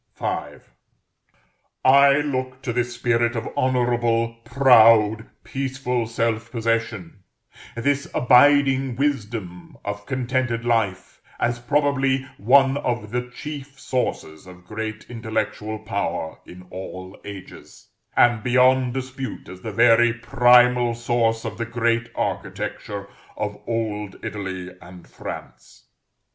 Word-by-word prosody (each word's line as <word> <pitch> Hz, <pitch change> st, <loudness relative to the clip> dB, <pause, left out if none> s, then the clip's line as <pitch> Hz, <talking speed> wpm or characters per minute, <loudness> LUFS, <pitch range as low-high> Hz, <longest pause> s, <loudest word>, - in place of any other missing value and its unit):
V. -, -, -6 dB, 1.6 s
I 140 Hz, +1 st, +7 dB
look 130 Hz, -2 st, -3 dB
to 120 Hz, -, -2 dB
this 120 Hz, 0 st, -1 dB
spirit 120 Hz, 0 st, +1 dB
of 115 Hz, -, -3 dB
honorable, 120 Hz, -2 st, +1 dB
proud, 115 Hz, -3 st, +5 dB, 0.2 s
peaceful 130 Hz, -3 st, -2 dB
self 115 Hz, 0 st, -1 dB
possession, 115 Hz, -5 st, -2 dB, 0.5 s
this 140 Hz, +4 st, 0 dB
abiding 135 Hz, 0 st, +4 dB
wisdom 110 Hz, -10 st, -3 dB
of 105 Hz, 0 st, -5 dB
contented 130 Hz, -2 st, -1 dB
life, 110 Hz, -6 st, -1 dB, 0.2 s
as 120 Hz, 0 st, 0 dB
probably 135 Hz, 0 st, +1 dB
one 135 Hz, +5 st, +4 dB
of 120 Hz, -6 st, -3 dB
the 125 Hz, 0 st, -3 dB
chief 140 Hz, +1 st, -8 dB
sources 125 Hz, -, -3 dB
of 90 Hz, 0 st, -14 dB
great 110 Hz, +2 st, -5 dB
intellectual 110 Hz, -2 st, -3 dB
power 105 Hz, -6 st, -3 dB
in 90 Hz, +1 st, -12 dB
all 95 Hz, 0 st, -8 dB
ages, 100 Hz, -2 st, -11 dB, 0.3 s
and 120 Hz, -2 st, +4 dB
beyond 125 Hz, +1 st, +3 dB
dispute 130 Hz, 0 st, -5 dB
as 95 Hz, 0 st, -11 dB
the 110 Hz, -, -5 dB
very 115 Hz, +2 st, +5 dB
primal 120 Hz, 0 st, +4 dB
source 115 Hz, -1 st, 0 dB
of 110 Hz, 0 st, -5 dB
the 115 Hz, -, -1 dB
great 115 Hz, 0 st, 0 dB
architecture 100 Hz, -1 st, -4 dB, 0.3 s
of 105 Hz, -1 st, -3 dB
old 105 Hz, -3 st, -3 dB
Italy 95 Hz, -3 st, -5 dB
and 90 Hz, 0 st, -13 dB
France. -, -, -10 dB
120 Hz, 110 wpm, -23 LUFS, 110-130 Hz, 1.6 s, I